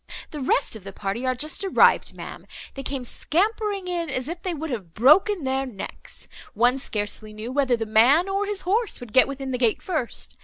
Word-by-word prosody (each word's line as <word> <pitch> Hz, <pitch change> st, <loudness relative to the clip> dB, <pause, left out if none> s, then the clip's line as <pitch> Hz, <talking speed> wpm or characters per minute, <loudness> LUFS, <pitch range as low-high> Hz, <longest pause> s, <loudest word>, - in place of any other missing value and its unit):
The 300 Hz, -, -6 dB
rest 265 Hz, -1 st, +1 dB
of 215 Hz, -, -10 dB
the 195 Hz, -, -7 dB
party 205 Hz, +6 st, -3 dB
are 255 Hz, -, +1 dB
just 305 Hz, +9 st, -2 dB
arrived, 385 Hz, -, +4 dB
ma'am; -, -, -9 dB, 0.3 s
they 275 Hz, -, -6 dB
came 270 Hz, -1 st, -4 dB
scampering 400 Hz, -, -1 dB
in, 345 Hz, -3 st, -2 dB
as 255 Hz, -1 st, -2 dB
if 340 Hz, +2 st, -5 dB
they 370 Hz, -, -2 dB
would 315 Hz, 0 st, -5 dB
have 185 Hz, -9 st, -6 dB
broken 320 Hz, -, +5 dB
their 265 Hz, 0 st, -1 dB
necks; 210 Hz, -6 st, -9 dB, 0.3 s
one 245 Hz, +5 st, +3 dB
scarcely 215 Hz, -2 st, -3 dB
knew 215 Hz, +3 st, -6 dB
whether 260 Hz, -3 st, +2 dB
the 225 Hz, -, -3 dB
man, 245 Hz, -, +5 dB
or 395 Hz, +1 st, -1 dB
his 410 Hz, -2 st, -1 dB
horse 425 Hz, +5 st, 0 dB
would 245 Hz, -3 st, -10 dB
get 255 Hz, -, +6 dB
within 270 Hz, -1 st, -5 dB
the 250 Hz, -, -2 dB
gates 235 Hz, -4 st, +1 dB
first. 310 Hz, -10 st, -3 dB
270 Hz, 205 wpm, -24 LUFS, 235-350 Hz, 0.3 s, get